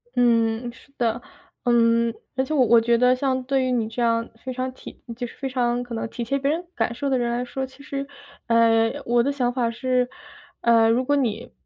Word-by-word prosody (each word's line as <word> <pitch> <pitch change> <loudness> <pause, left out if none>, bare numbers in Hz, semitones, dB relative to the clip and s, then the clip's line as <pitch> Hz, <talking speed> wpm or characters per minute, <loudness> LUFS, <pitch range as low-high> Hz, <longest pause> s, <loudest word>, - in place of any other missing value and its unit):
嗯， 235 -1 +2
是 265 +4 -19
的。 235 0 0 0.4
嗯， 235 -1 +3 0.2
而 260 - +1
且 265 - -7
我 265 -4 +4
我 230 0 +6
觉 235 +1 +3
得 250 +1 +4
像 260 0 -1
对 265 +1 +1
于 255 - 0
你 235 -3 0
这 225 +2 -5
样 230 0 +1 0.2
非 260 - -4
常 255 +1 -3
体 - - -13
就 245 +1 -4
是 - - -14
非 275 - -3
常 245 -2 0
可 245 -1 -9
能 225 - -3
体 240 - -5
贴 275 +4 -1
别 275 +1 0
人 330 +4 -1
感 235 - -1
受 280 +3 -2
的 265 - +2
人 240 -1 0
来 245 +1 -2
说， 265 +2 -4
其 265 +2 -15
实， 275 0 -4 0.4
呃， 230 -1 +4
我 240 0 +3
的 275 +4 +1
想 250 -3 -1
法 240 -2 0
是， 250 +1 0 0.5
呃， 230 -1 +4
如 240 +3 +2
果 290 - +2
你 245 -7 -1
245 Hz, 240 characters per minute, -23 LUFS, 230-260 Hz, 0.5 s, 我